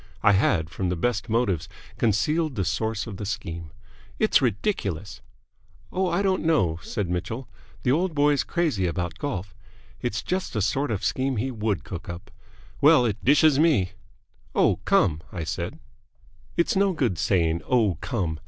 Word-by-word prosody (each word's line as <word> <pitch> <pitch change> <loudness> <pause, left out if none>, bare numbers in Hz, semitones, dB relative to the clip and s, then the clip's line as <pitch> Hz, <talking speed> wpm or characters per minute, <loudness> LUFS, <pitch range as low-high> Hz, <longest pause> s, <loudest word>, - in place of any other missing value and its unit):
I 105 - +6
had 95 -5 +2
from 95 -2 -2
the 90 - 0
best 110 +5 -1
motives 110 -8 0 0.3
concealed 150 +8 +1
the 95 - -1
source 110 +5 -1
of 105 -5 -7
the 105 - -5
scheme. 85 -5 -5 0.5
"It's 215 - +4
ridiculous!" 105 - -2 0.7
"Oh, 185 0 +1
I 200 - +1
don't 190 -1 +1
know," 95 - +2
said 100 -3 -3
Mitchell. 110 +9 -3 0.4
"The 125 - +3
old 170 +3 +1
boy's 145 -1 +3
crazy 150 - 0
about 85 0 -3
golf. 100 -9 -4 0.5
It's 120 -4 -2
just 185 +1 -2
the 105 - 0
sort 135 +7 0
of 105 -4 -2
scheme 130 -1 0
he 130 +5 -1
would 105 -4 -1
cook 85 -2 -7
up. 85 +1 -8 0.5
Well, 145 -3 +6
it 105 -4 -2
dishes 145 +1 +5
me!" 140 - +3 0.6
"Oh, - - +4
come!" 80 -5 +3
I 85 -3 -4
said. - - -4 0.8
"It's 170 - +2
no 195 0 +3
good 120 - 0
saying 85 -3 +1
'Oh, 110 - +2
come!' 90 - -2
110 Hz, 160 wpm, -25 LUFS, 90-145 Hz, 0.8 s, I